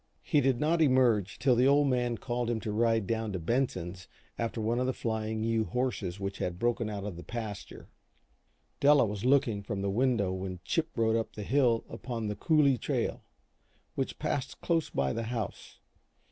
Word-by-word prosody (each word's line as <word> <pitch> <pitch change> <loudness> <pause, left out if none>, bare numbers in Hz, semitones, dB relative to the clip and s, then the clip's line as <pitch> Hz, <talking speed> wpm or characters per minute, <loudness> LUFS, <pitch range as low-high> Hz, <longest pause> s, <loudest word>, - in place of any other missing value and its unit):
He 145 - +2
did 130 -2 +2
not 165 +2 +2
emerge 125 - +3
till 130 -2 +3
the 125 +2 +4
Old 145 +1 +4
Man 120 -2 0
called 120 0 -2
to 120 - +1
him 110 - -2
to 105 - -3
ride 115 0 +2
down 110 +1 -1
to 95 - -2
Benson's 95 -3 -2 0.3
after 115 0 -3
one 115 +2 0
of 125 - 0
the 130 - 0
Flying 110 -1 -2
U 115 -1 +1
horses 115 -8 -2
which 100 0 -4
had 90 -1 -2
broken 120 +1 0
out 100 -2 -4
of 100 -4 -5
the 85 - -8
pasture. 110 -4 -7 0.9
Della 145 -2 +6
was 105 +1 -4
looking 130 -6 +3
from 100 -1 -4
the 100 - 0
window 115 -4 +1
when 95 -1 -5
Chip 165 -1 0
rode 115 -1 +3
up 115 -1 -2
the 105 - -5
hill 120 -1 +2
upon 115 -1 -5
the 105 - -3
"coulee 140 +1 +3
trail," - - -1 0.7
which - - -3
passed 135 -1 -3
close 165 -2 0
by 70 -1 0
the 115 0 -3
house. 115 -4 -5
115 Hz, 190 wpm, -30 LUFS, 105-130 Hz, 0.9 s, Della